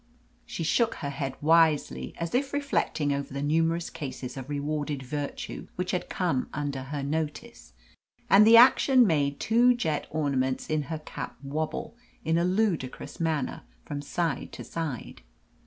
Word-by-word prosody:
She 240 -9 -4
shook 230 +8 +2
her 140 -3 -4
head 135 -2 -4
wisely, 150 - +3
as 170 0 -4
if 275 +3 0
reflecting 270 - 0
over 140 0 -4
the 140 +1 -3
numerous 165 +3 +1
cases 130 -3 -6
of 135 0 -7
rewarded 145 -1 -2
virtue 145 +2 -5
which 180 0 -2
had 180 - -2
come 170 -9 -1
under 140 -2 -3
her 140 +1 -4
notice, 145 - -4 0.5
and 200 +2 +7
the 230 +1 +9
action 255 +1 +7
made 145 -6 +1
two 240 +3 +4
jet 160 -10 -1
ornaments 135 -4 0
in 155 -1 +2
her 160 - -2
cap 145 -4 -7
wobble, 155 +9 -3 0.3
in 165 +1 +2
a - - +2
ludicrous 180 -8 -1
manner, 160 -5 -1 0.2
from 145 -1 -4
side 145 0 -2
to - - -7
side. 155 - -5
155 Hz, 155 wpm, -27 LUFS, 140-170 Hz, 0.5 s, the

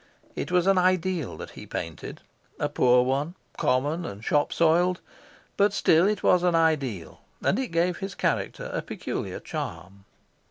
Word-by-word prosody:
It - - -4
was 180 -1 +3
an 195 -1 +4
ideal 185 -4 0
that - - -8
he - - -11
painted 80 -2 -6 0.4
a - - +1
poor 125 0 +4
one, 140 +7 -1 0.2
common 145 +7 0
and 105 -8 -7
shop 145 -1 +2
soiled, 175 +2 +3 0.6
but 200 0 +3
still 170 -1 +4
it 210 -2 -1
was 180 - +4
an 175 -1 +2
ideal; 140 - 0 0.2
and 200 - +2
it 265 - -1
gave 170 0 0
his 195 -1 -6
character - - -2
a - - -1
peculiar - - -5
charm. 95 +2 -7
165 Hz, 160 wpm, -26 LUFS, 130-180 Hz, 0.6 s, an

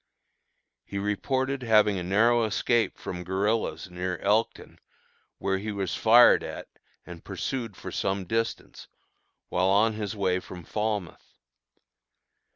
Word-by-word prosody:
He 100 - -7
reported 130 +7 -1
having 105 -4 +3
a - - -4
narrow 115 +6 +3
escape 115 +2 0
from 90 -1 -6
guerillas 100 +4 -1
near 90 0 -3
Elkton, 105 +6 -1 0.6
where 95 0 -1
he 105 +2 -4
was 100 -2 -3
fired 120 +2 +6
at - - -7 0.4
and 85 -2 -11
pursued 110 +2 -4
for - - -7
some 95 -1 -2
distance, 115 +4 -3 0.6
while 90 +1 +1
on 105 +3 +3
his 105 0 -4
way 95 -3 0
from 90 -1 -10
Falmouth. 105 -1 -4
105 Hz, 125 wpm, -27 LUFS, 95-115 Hz, 0.6 s, fired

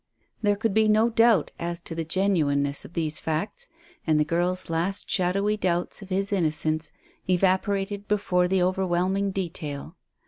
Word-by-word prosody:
There 205 -2 +2
could 220 0 -1
be 220 +1 +4
no 215 +2 +3
doubt 225 -7 +4
as 170 0 -2
to 170 - -7
the 165 0 -2
genuineness 155 -6 +1
of - - -13
these 155 -3 -2
facts, 205 - -3 0.4
and 155 -1 +3
the 150 - +3
girl's 175 +3 -1
last 170 +4 -1
shadowy 195 +3 +1
doubts 180 0 -1
of 195 - -10
his 195 +2 -1
innocence 155 -3 0 0.4
evaporated 195 +2 +1
before 180 -4 +1
the 185 0 +2
overwhelming 185 +1 0
detail. 165 -4 -5
185 Hz, 150 wpm, -26 LUFS, 165-200 Hz, 0.4 s, be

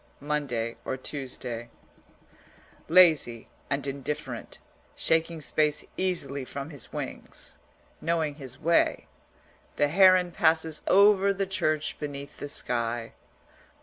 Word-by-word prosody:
MONDAY 135 -6 -2
OR 130 - -3
TUESDAY 125 -4 -6 1.2
Lazy 160 -10 +4 0.2
and 140 0 -1
indifferent, 140 +1 -5 0.4
shaking 165 0 +1
space 150 0 0
easily 155 -7 -2
from 140 +3 -7
his 140 -5 -8
wings, - - -7 0.5
knowing 160 -2 0
his 135 -3 -10
way, 170 +2 +2 0.7
the 145 - +2
heron 185 +1 +5
passes 160 -1 +1
over 200 0 +6
the 195 0 -1
church 165 -6 -1
beneath 140 -1 -6
the 145 - -5
sky. 115 -3 -1
150 Hz, 105 wpm, -27 LUFS, 135-170 Hz, 1.2 s, over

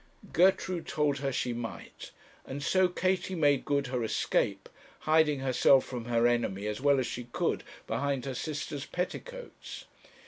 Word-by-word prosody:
Gertrude 185 0 +2
told 145 -2 0
her 140 0 -1
she 125 -1 -1
might, 115 -1 -7 0.4
and 140 +2 -5
so 185 +4 +3
Katie 185 +1 -1
made 145 -5 +2
good 140 -1 +1
her 125 -2 -2
escape, 110 - 0 0.3
hiding 155 -3 +3
herself 135 0 +4
from 120 -3 -6
her 120 -1 +2
enemy 115 -5 +1
as 105 +3 -3
well 140 0 +4
as 130 - 0
she 120 0 -5
could 120 - -1 0.2
behind 135 +3 -1
her 135 - -3
sister's 145 +1 -4
petticoats. - - -6
140 Hz, 150 wpm, -30 LUFS, 120-160 Hz, 0.4 s, herself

